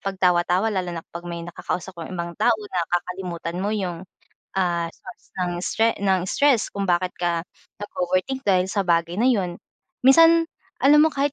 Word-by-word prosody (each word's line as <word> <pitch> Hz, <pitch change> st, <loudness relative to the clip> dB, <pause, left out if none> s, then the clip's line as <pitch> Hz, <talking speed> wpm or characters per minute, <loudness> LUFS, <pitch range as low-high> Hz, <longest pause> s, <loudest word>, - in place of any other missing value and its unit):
pagtawa-tawa 185 Hz, +1 st, +1 dB
lalo 180 Hz, -3 st, -2 dB
na 165 Hz, -, -7 dB
kapag 175 Hz, +1 st, -9 dB
may 170 Hz, -1 st, -5 dB
nakakausap 180 Hz, +2 st, -5 dB
kang 170 Hz, -2 st, -8 dB
ibang 170 Hz, -2 st, -4 dB
tao, 230 Hz, +1 st, +4 dB
nakakalimutan 175 Hz, -3 st, -3 dB
mo 200 Hz, -, -1 dB
yung, 185 Hz, -6 st, -2 dB, 0.5 s
ah, 170 Hz, -3 st, 0 dB, 0.2 s
isang 180 Hz, -2 st, -5 dB
stre 225 Hz, +1 st, +1 dB
ng 190 Hz, -2 st, +1 dB
stress 280 Hz, -7 st, +3 dB
kung 200 Hz, 0 st, -4 dB
bakit 180 Hz, 0 st, 0 dB
ka 175 Hz, -1 st, 0 dB, 0.4 s
nag-o-overthink 185 Hz, +6 st, -2 dB
dahil 185 Hz, -2 st, +2 dB
sa 200 Hz, 0 st, -1 dB
bagay 170 Hz, 0 st, +1 dB
na 230 Hz, -, +1 dB
'yon. 195 Hz, -9 st, +1 dB, 0.5 s
Minsan 330 Hz, +5 st, +7 dB, 0.4 s
alam 295 Hz, +2 st, +7 dB
mo, 315 Hz, -, +6 dB
kahit 285 Hz, -2 st, -1 dB
185 Hz, 160 wpm, -23 LUFS, 175-215 Hz, 0.5 s, Minsan